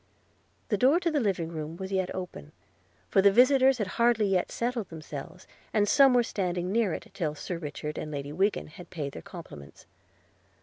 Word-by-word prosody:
The 210 -4 +1
door 265 +5 +5
of 355 - 0
the 295 - +2
dining 190 -8 0
room 160 0 -6
was 190 +1 -6
yet 190 -2 0
open, 180 - -7 0.5
for 195 - +3
the 200 0 +6
visitors 260 +3 +5
had 210 - -1 0.2
hardly 235 -2 +4
yet 190 -2 +1
settled 235 -3 -2
themselves, 160 +2 -8 0.3
and 205 -1 +3
some 270 +2 +6
were 245 - +5
standing 180 -4 -2
near 220 -3 +2
it - - -7
till 155 -5 -2
Sir 170 +3 -5
Richard 150 -1 -5
and 155 - -5
Lady 145 -1 -5
Wiggin 195 +7 0
had 170 +3 -12
paid 145 -5 -4
their - - -8
compliments. 165 - -11
190 Hz, 185 wpm, -28 LUFS, 160-225 Hz, 0.5 s, the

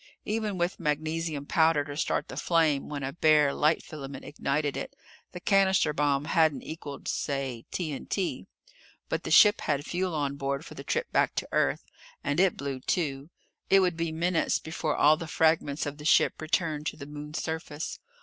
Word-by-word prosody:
Even 215 -2 -2
with 175 +1 -1
magnesium 155 0 -2
powder 160 -2 +3
to 145 -1 -7
start 155 - -1
the - - -8
flame 160 -5 +1
when 145 -2 -4
a 135 +1 -3
bare 155 -4 +4
light 155 +2 +2
filament 140 -3 -8
ignited 145 0 -1
it, - - -5 0.4
the 180 - -7
cannister 190 -4 +3
bomb 145 -1 +1
hadn't 160 -3 +2
equaled 145 -3 -8
say 135 -5 -2
T.N.T. 175 +3 -3 0.6
But - - -1
the - - -3
ship 210 +1 +7
had 145 0 -1
fuel 180 -1 -2
on 140 -2 -1
board 140 +2 -2
for - - -10
the - - -9
trip 475 0 -2
back - - +2
to - - -2
Earth. - - +1 0.4
And 145 +3 0
it 190 -1 +3
blew, 140 -2 -4
too. 140 0 -2 0.4
It 195 0 +6
would 180 -2 +1
be 165 -1 -2
minutes 165 +1 +1
before 160 -1 -3
all 155 +1 +5
the 165 0 -6
fragments 160 -2 +1
of 145 0 -5
the 150 - -9
ship 155 - +3
returned 155 -1 -1
to - - -3
the 140 - -8
Moon's 150 +1 -6
surface. 160 -1 -4
155 Hz, 180 wpm, -28 LUFS, 145-165 Hz, 0.6 s, ship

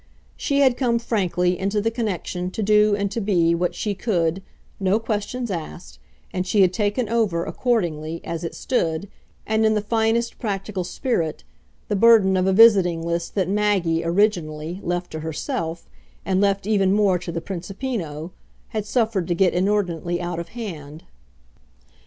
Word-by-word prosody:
She 280 -1 0
had 260 -3 +4
come, 240 -3 +2
frankly, 180 -6 0
into 200 +2 0
the 225 +2 0
connection, 185 -5 -3
to 220 - -2
do 210 0 +4
and 200 -1 -2
to 230 - -2
be 175 -5 +2
what 175 +1 -1
she 210 - -2
could, 185 -4 0 0.4
"no 195 +1 +2
questions 225 +2 -3
asked," 75 - -7 0.3
and 185 0 -2
she 205 +1 +3
had 185 -1 +4
taken 210 +3 0
over, 210 -7 0
accordingly, 165 -10 -1
as 165 0 -5
it 165 - -5
stood, 170 -7 -1 0.4
and 220 0 +1
in 220 0 +3
the - - +2
finest 225 +2 0
practical 195 -3 -3
spirit, 175 - -2 0.4
the 210 - 0
burden 210 -3 +5
of 185 0 +1
a - - +4
visiting 190 -6 +6
list 170 0 -3
that 190 -4 +1
Maggie, 195 -5 +1
originally, 170 -3 0
left 175 +1 -2
to 155 - -5
herself, 160 +1 -4 0.4
and 190 0 +1
left 200 -1 +1
even 195 -3 +2
more 200 -3 +3
to 170 0 -6
the 165 - -3
Principino, 180 - -5 0.4
had 215 -1 -4
suffered 220 -7 0
to 175 - 0
get 185 +1 +3
inordinately 180 -3 0
out 175 -1 -3
of 170 - -5
hand. 160 -10 -7
195 Hz, 165 wpm, -23 LUFS, 170-215 Hz, 0.4 s, visiting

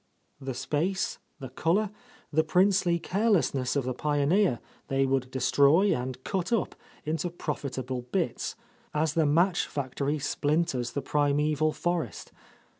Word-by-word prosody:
The 135 -2 -5
space, 155 +9 -1 0.2
the 130 - -8
colour, 180 +10 +1 0.4
the 160 +1 +4
princely 180 +1 +3
carelessness 175 - +1
of 140 - +1
the 130 - -1
pioneer 150 - +2 0.3
they 135 0 +2
would 130 -1 0
destroy 140 +9 +4
and 130 +1 -5
cut 185 -1 -2
up 230 -5 +1 0.3
into 160 +3 -1
profitable 130 -6 -4
bits, 170 -11 -1 0.4
as 155 0 +1
the 160 -2 +2
match 175 +5 +2
factory 140 +1 -2
splinters 145 -4 0
the 140 - -2
primeval 150 +2 +1
forest. 170 - -3
150 Hz, 125 wpm, -28 LUFS, 135-175 Hz, 0.4 s, the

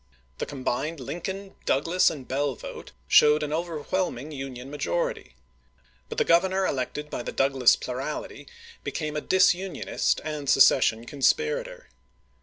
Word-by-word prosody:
The - - -3
combined 145 +3 -3
Lin 160 +7 -6
coln, 195 +2 -5
Douglas, 165 +7 +3
and 140 -5 -8
Bell 140 0 -1
vote - - -9 0.2
showed 150 - +6
an 150 0 -3
over 165 0 -2
whelming 155 -3 -2
Union 135 -2 -7
majority; - - -2 0.7
but 455 - -6
the 460 - +2
Grovernor 190 - +3
elected 150 +3 -3
by - - -3
the - - -5
Douglas 135 -2 +4
plurality 130 +4 -5 0.4
became 155 -2 -4
a 150 - -1
dis 190 +3 +4
unionist 185 0 -2
and 150 -3 -4
secession 120 -4 +5
conspirator. 470 - 0
150 Hz, 140 wpm, -26 LUFS, 135-185 Hz, 0.7 s, showed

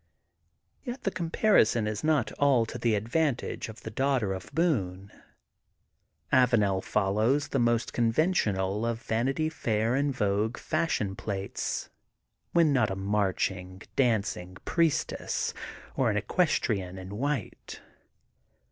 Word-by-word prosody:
Yet 250 +1 -6
the 195 - 0
comparison 170 - +2
is 105 0 -3
not 150 -8 +2
all 135 -5 +4
to - - -7
the 115 -2 +2
advantage 120 +4 -1
of 110 - -11
the 110 - -7
daughter 130 -5 +1
of 95 -1 -8
Boone. 100 - 0 1.2
Avanel 105 -7 +3
follows 110 +8 +1
the 135 - 0
most 120 -1 +1
conventional 115 - +1
of 115 -1 -1
Vanity 135 +8 0
Fair 115 -7 0
and 140 +2 +1
Vogue 105 -1 0
fashion 155 - -1
plates, 100 -2 -4 0.6
when 165 -4 +4
not 120 -5 +3
a 95 - -2
marching, 95 -2 -1
dancing 100 -7 0
priestess 165 -3 0 0.4
or 130 -3 +2
an 105 - 0
eques 160 - +2
trienne 95 -4 -2
in 95 +3 -7
white. 140 -5 -3
115 Hz, 120 wpm, -28 LUFS, 100-140 Hz, 1.2 s, all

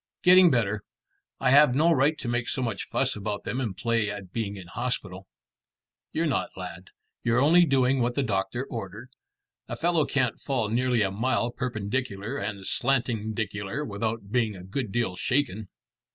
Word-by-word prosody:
"Getting 180 0 +8
better. 110 -5 +1 0.6
I 130 - +2
have 140 -2 +6
no 160 +4 +4
right 150 +1 +3
to 130 - -5
make 120 0 -1
so 130 - 0
much 115 -5 -3
fuss - - +1
about 105 0 -4
them 125 +6 -3
and 110 -7 -3
play 115 -3 0
at 95 -3 -7
being 105 -3 -2
in 95 -2 -9
hospital." 95 -3 -4 0.8
"You're - - 0
not, - - 0
lad. - - -8 0.3
You're 115 +1 +2
only 170 +6 +6
doing 135 -2 +2
what 120 0 0
the 140 - +1
doctor 110 +3 -1
ordered. 115 +1 -7 0.6
A - - -4
fellow 165 -1 +2
can't 130 -4 0
fall 125 -6 -1
nearly 120 0 +2
a 95 - 0
mile 120 +3 0
perpendicular 115 -1 -3
and 100 -1 -5
slantingdicular 110 -2 -1
without 110 0 -3
being 115 -4 +1
a 90 - -10
good 105 +3 -4
deal 115 -5 -1
shaken." 110 -4 0
115 Hz, 165 wpm, -27 LUFS, 100-130 Hz, 0.8 s, Getting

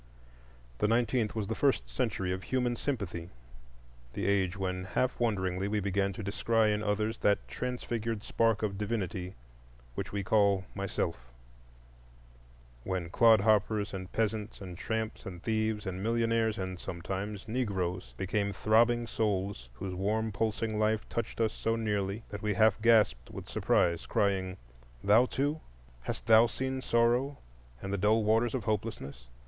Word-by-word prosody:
The - - +3
nineteenth 115 0 +1
was 105 -3 -2
the - - -1
first - - +1
century 90 +9 -1
of 95 0 -2
human 125 +2 0
sympathy,—the - - -7
age 100 -1 +1
when 90 -1 -2
half 125 +6 -1
wonderingly 95 -5 0
we 105 +1 0
began 100 0 0
to 105 - -6
descry 110 +2 +2
in 105 - -1
others 110 +1 -1
that 100 0 +2
transfigured 115 -3 -3
spark 115 -2 +1
of 100 -2 -2
divinity 100 -4 -3 0.6
which - - -4
we 100 -1 -2
call 100 -2 +3
Myself; 85 -10 -3 1.5
when 90 0 -3
clodhoppers 110 -1 +4
and 95 -1 -6
peasants, 110 -1 -1
and 90 -3 -7
tramps 110 +4 -3
and 90 -2 -8
thieves, 110 -1 0
and 95 0 -4
millionaires 115 0 +1
and—sometimes—Negroes, 95 +1 -3
became 100 +1 -1
throbbing 115 +3 +3
souls 100 - -2
whose 95 +8 -5
warm 110 +4 0
pulsing 110 +1 -1
life 110 0 +1
touched 115 -1 -3
us 110 -2 +2
so 115 0 -1
nearly 105 -1 -1
that 105 0 -6
we 105 -1 0
half 110 -1 +4
gasped 105 - +4
with - - -8
surprise, 85 -1 +1
crying, 95 -2 0 0.5
"Thou 110 +5 +5
too! 145 +5 -1 0.4
Hast - - -5
Thou 115 +1 +7
seen 130 +2 -3
Sorrow 120 +4 +2 0.5
and 95 - -3
the 100 - -1
dull 110 +3 +3
waters 115 +3 +2
of 125 - -2
Hopelessness? 100 - -3
105 Hz, 140 wpm, -31 LUFS, 95-115 Hz, 1.5 s, Thou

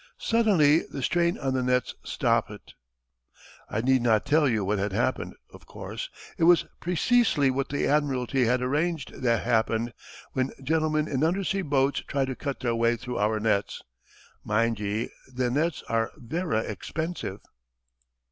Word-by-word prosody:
Suddenly 190 -10 +4
the 135 - -5
strain 170 0 +1
on 135 -2 -1
the 130 - +1
nets 125 0 +1
stoppit. - - -1 1.0
"I 110 - -1
needna 120 -3 +3
tell 150 +4 +2
you 110 -5 0
what 100 +1 0
had 100 0 -1
happened. - - -1 0.2
Of - - -15
course, - - -6 0.3
it 165 - +4
was 175 0 +6
preceesely 180 - +2
what 135 +1 -2
the 140 - -1
Admiralty 135 -3 +1
had 125 +2 +1
arranged 150 +3 -1
tae 120 -2 0
happen 115 0 0 0.4
when 130 +1 -1
gentlemen 155 +1 +1
in 140 -1 -1
undersea 195 +3 +1
boats 140 -4 +1
try 140 -1 0
to 130 -1 -4
cut 140 -1 -4
their 120 -3 0
way 115 +1 +2
through 125 0 -5
our 110 +1 +1
nets. 105 -2 0 0.6
Mind 115 +1 +1
ye, 105 +3 -2 0.2
thae 125 -1 +1
nets 155 +5 0
are 115 0 0
verra 140 -2 -1
expensive." 115 - -4
130 Hz, 150 wpm, -27 LUFS, 115-155 Hz, 1.0 s, was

